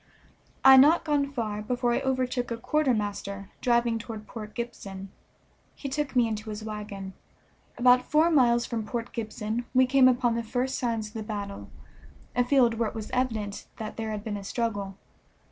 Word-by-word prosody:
I 270 - +10
had 265 - +10
not 315 +5 +5
gone 285 -2 +1
far 215 -5 -3
before 245 +2 0
I - - +1
overtook 255 -2 -1
a 235 - -3
quartermaster 210 -8 -1
driving 235 -1 +2
toward 225 -2 -7
Port 215 -1 -9
Gibson; 195 -5 -6 0.6
he 275 - -6
took 285 0 -2
me 240 -2 +4
into 215 0 -4
his 210 0 -6
wagon. 205 -3 -6 0.6
About 250 0 +4
four 315 +3 +4
miles 240 -5 +4
from 230 -2 -3
Port 235 +2 -5
Gibson 220 +1 -3
we 255 0 +6
came 260 0 +5
upon 245 -2 +3
the 235 - -1
first 245 +3 -2
signs 225 -3 -1
of - - -21
the 225 - -4
battle, 205 -2 -6 0.7
a 245 - +4
field 245 -3 +3
where 230 -2 +1
it - - -14
was 220 -1 -6
evident 225 -6 -2
that 215 -1 -6
there 220 -1 -3
had 210 -1 -4
been 210 -2 -3
a 200 - -7
struggle. 200 -3 -3
230 Hz, 180 wpm, -27 LUFS, 215-255 Hz, 0.7 s, I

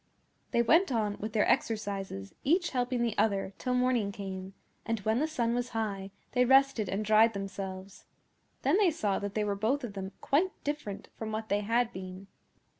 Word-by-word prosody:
They 235 - +2
went 330 - +4
on 215 -4 0
with 215 +1 -5
their 215 - +3
exercises, 195 - -1
each 345 +5 +2
helping 250 -1 0
the 230 -2 0
other, 200 -2 +1
till 250 0 0
morning 250 -5 +2
came; 190 -1 -6 0.3
and 225 -1 -1
when 220 +4 +1
the 310 - +1
sun 240 -7 0
was 245 0 -1
high 200 -3 -2 0.2
they 250 0 +3
rested 265 -5 +4
and 205 +3 -1
dried 220 +2 +5
themselves. 195 -1 -6 0.6
Then 295 +9 +3
they 400 -4 +5
saw 210 -11 0
that 200 -1 -5
they 215 - +1
were 205 -1 0
both 225 +8 0
of 230 -4 -5
them 195 -1 -6
quite 330 +6 +1
different 290 -9 -4
from 220 -1 -5
what 220 0 -4
they 205 - +2
had 230 +3 +1
been. 185 +1 -8
220 Hz, 190 wpm, -30 LUFS, 200-250 Hz, 0.6 s, dried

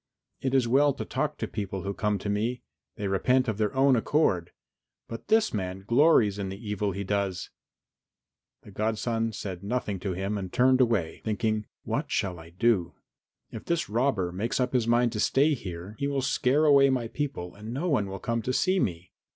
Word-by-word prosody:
It 135 0 0
is 130 -3 +3
well 140 +4 +4
to - - -5
talk - - -2
to - - -2
the - - -12
people 95 -2 -4
who 100 0 -3
come 105 +1 0
to 100 - -6
me; 115 +4 -1 0.3
they 100 - -3
repent 125 +7 +2
of 110 -2 -2
their 105 -1 +1
own 135 0 +5
accord, 110 - +1 0.6
but 115 - -8
this 220 0 +3
man 95 -2 -3
glories 115 -5 +4
in 95 -1 -3
the 95 - -6
evil 105 -1 -2
he 100 +2 -4
does." 100 -2 -2 1.1
The 105 - -13
godson 115 +2 -1
said 95 -4 -6
nothing 105 -3 -2
to 95 0 -3
him 100 +3 -2
and 95 -2 -6
turned 130 +1 +4
away, 105 -10 0
thinking, 110 -1 -1 0.2
"What - - -2
shall 90 -3 -1
I 80 0 -12
do? 90 -1 +1 0.6
If 110 - -8
this 170 -8 -1
robber 110 -7 +1
makes 105 +9 -2
up 125 0 0
his 120 -3 +1
mind 120 0 +3
to 110 - -4
stay 140 +7 +3
here, 95 -4 -7
he 140 - 0
will 140 -2 -1
scare 135 +3 +2
away 140 -2 +6
my 125 -3 0
people 135 -10 -4
and 105 +2 -9
no 140 +9 -2
one 125 - +1
will 95 0 -5
come 115 +4 -2
to 130 +4 -2
see 185 +7 +2
me. 90 - -2
110 Hz, 200 wpm, -27 LUFS, 95-130 Hz, 1.1 s, away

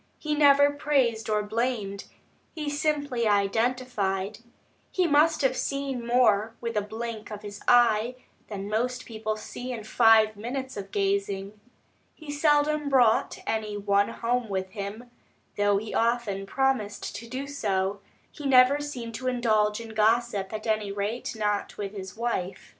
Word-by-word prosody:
He 305 -1 -2
never 285 -1 +6
praised 265 -7 0
or 210 -1 +1
blamed, 215 -2 -2 0.5
he 300 -2 -3
simply 290 -5 0
identified. 210 -1 0 0.5
He 370 - +1
must 310 0 +3
have 260 -1 +2
seen 275 -3 -3
more 225 -3 +3
with 230 -1 -4
a 210 - +2
blink 220 +1 -6
of 210 -1 -8
his 205 -1 -8
eye, 240 0 +4 0.3
than 200 -2 -6
most 245 +4 -1
people 220 -1 -3
see 245 +4 -7
in 230 -3 -5
five 220 -1 +5
minutes 260 +5 -5
of 195 -1 -6
gazing. 200 +1 -1 0.6
He 310 -2 -8
seldom 295 0 +2
brought 245 -5 +3
any 215 -2 -2
one 200 0 +2
home 240 -1 -1
with 190 -1 -3
him, 210 +5 -7 0.4
though 205 -1 +2
he 215 +2 -5
often 225 -4 0
promised 260 -5 -1
to 235 - -9
do 260 +3 -4
so; 200 -8 -1 0.3
he 295 -2 -5
never 260 +2 +6
seemed 250 -6 -6
to 255 +3 -5
indulge 215 -4 +2
in 230 -1 -8
gossip, 220 -2 +1
at 215 -1 -5
any 215 -2 0
rate 205 +5 -3
not 210 -1 -2
with 200 -1 -4
his 190 0 -8
wife. 195 -6 -3
225 Hz, 150 wpm, -27 LUFS, 205-255 Hz, 0.6 s, never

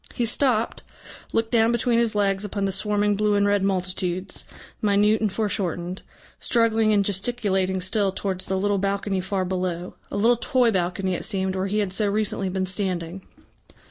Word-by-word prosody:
He 240 - 0
stopped, 235 -1 +2 0.5
looked 225 0 0
down 230 -1 +4
between 235 0 +2
his 230 -2 +1
legs 200 -1 +1
upon 200 -1 -2
the 195 - 0
swarming 205 +1 +1
blue 210 0 +1
and 205 0 +3
red 205 0 +2
multitudes, 185 -1 -1 0.4
minute 210 +1 +3
and 215 -3 +1
foreshortened, 185 -4 -2 0.4
struggling 225 -2 +2
and 200 -2 +3
gesticulating 195 -2 0
still 195 +1 +1
towards 190 -1 -2
the 190 - 0
little 200 +1 +1
balcony 195 0 -1
far 190 0 -2
below, 180 -1 -3 0.2
a - - -4
little 235 +4 +4
toy 250 -2 +2
balcony, 185 0 -1
it - - -3
seemed, 190 -3 -1
where 190 +1 -1
he 205 +2 -1
had 200 -3 -1
so 210 +1 +1
recently 200 -2 -1
been 185 0 -1
standing. 185 -2 -3
200 Hz, 175 wpm, -24 LUFS, 190-215 Hz, 0.5 s, down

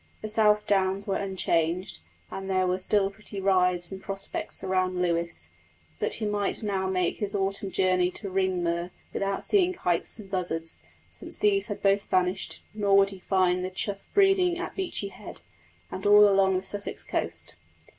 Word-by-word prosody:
The 215 - -3
South 210 -1 +3
Downs 195 0 +1
were 195 - 0
unchanged, 180 - -1 0.3
and 195 0 -6
there 185 -1 +2
were 185 +1 0
still 195 +1 +2
pretty 205 0 -8
rides 180 -2 +2
and 190 0 -7
prospects 195 -1 -3
round 185 -1 0
Lewes; 170 - -1 0.5
but - - -1
he 220 - -3
might 205 +1 -1
now 195 -2 -1
make 185 -2 0
his 205 -1 -3
autumn 195 0 -1
journey 185 -1 +2
to 205 - -6
Ringmer 175 -2 0 0.2
without 195 0 -2
seeing 370 -3 +3
kites 175 - -1
and 210 -3 -10
buzzards, 165 -3 -2 0.3
since - - -5
these 405 -1 +2
had 205 - -6
both 200 0 +2
vanished; 185 +1 0
nor 200 -2 +3
would 195 0 +4
he 195 - -10
find 185 -1 +1
the 185 - -2
chough 195 +1 -4
breeding 385 -3 +4
at 355 - -5
Beachy 355 - -2
Head, - - -10 0.5
and - - -6
all 205 0 +8
along 195 -1 +3
the 185 - -4
Sussex 205 +1 -4
coast. - - -3
195 Hz, 170 wpm, -27 LUFS, 185-205 Hz, 0.5 s, all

